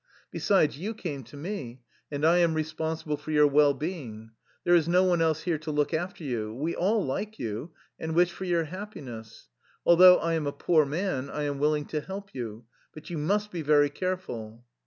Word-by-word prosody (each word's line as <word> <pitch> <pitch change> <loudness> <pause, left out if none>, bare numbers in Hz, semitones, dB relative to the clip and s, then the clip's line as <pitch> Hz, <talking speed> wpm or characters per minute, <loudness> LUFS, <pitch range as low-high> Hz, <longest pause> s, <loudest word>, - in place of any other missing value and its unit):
Besides, 155 -8 +2
you 215 +6 -4
came 150 -10 -5
to 145 - -13
me 140 - -6 0.3
and 145 +1 -1
I 170 +2 +5
am 170 -2 +3
re 155 - +1
sponsible 160 -1 -3
for 150 - -10
your 150 -1 +5
well 145 0 +4
being. 130 - -6 0.3
There 175 - +3
is 165 -2 +4
no 180 +2 +4
one 175 -2 +2
else 160 -1 +1
here 170 -4 0
to 155 +1 -7
look 150 +1 0
after 175 +2 -3
you. 115 -5 -3
We 155 +6 -2
all 205 +3 +1
like 210 +11 -3
you 115 +8 -5 0.3
and 160 0 -3
wish 175 0 +4
for 190 - -7
your 170 -2 +1
happiness. 145 - -9 0.4
Although 180 +1 +8
I 165 0 -1
am 160 -3 -1
a - - 0
poor 155 -4 +2
man, 145 -3 -2
I 150 - -3
am 145 -1 -2
willing 150 0 +1
to 150 - -3
help 195 +3 -8
you. 115 -3 -6 0.3
But 155 +3 -10
you 165 - -3
must 205 +7 0
be 170 - -4
very 145 -1 +4
careful." 120 - -5
155 Hz, 205 wpm, -28 LUFS, 145-175 Hz, 0.4 s, Although